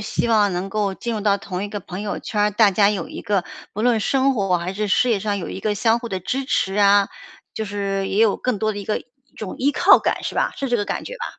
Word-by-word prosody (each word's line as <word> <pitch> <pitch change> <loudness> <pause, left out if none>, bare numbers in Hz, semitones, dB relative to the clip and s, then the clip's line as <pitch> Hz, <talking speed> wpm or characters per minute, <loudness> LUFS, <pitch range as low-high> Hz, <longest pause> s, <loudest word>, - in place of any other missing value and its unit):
希 210 +3 -2
望 210 -3 +3
能 180 +2 -3
够 200 -1 -1
进 235 +4 -4
入 215 - -3
到 200 -1 +2
同 190 -1 -5
一 - - -5
个 205 0 -5
朋 180 +1 -7
友 205 -1 -3
圈 210 - -3
儿， 210 - +3
大 210 0 +5
家 200 +1 +4
有 205 - -3
一 - - -7
个 200 -3 0 0.3
不 210 - -4
论 240 -1 +3
生 270 +5 +2
活 195 -5 +1
还 175 +2 -4
是 210 +2 -2
事 240 +5 +2
业 220 - +2
上 205 0 -2
有 175 - -5
一 - - -6
个 210 -1 -1
相 225 +2 +2
互 235 0 -7
的 190 -3 -3
支 265 +9 -2
持 195 -6 0
啊， 200 -1 +5 0.5
就 220 - -3
是 200 -1 -2
也 200 - -1
有 215 -3 +3
更 250 -5 -2
多 215 +1 0
的 205 - -6
一 200 - -6
个 210 - -1
一 - - -17 0.3
种 210 -4 -6
依 280 +3 +2
靠 - - +6
感， - - -1
是 - - -4
吧？ - - +1
是 275 - -3
这 240 - +2
个 205 - -1
感 - - -4
觉 - - -7
吧。 485 - -5
205 Hz, 310 characters per minute, -21 LUFS, 195-225 Hz, 0.5 s, 靠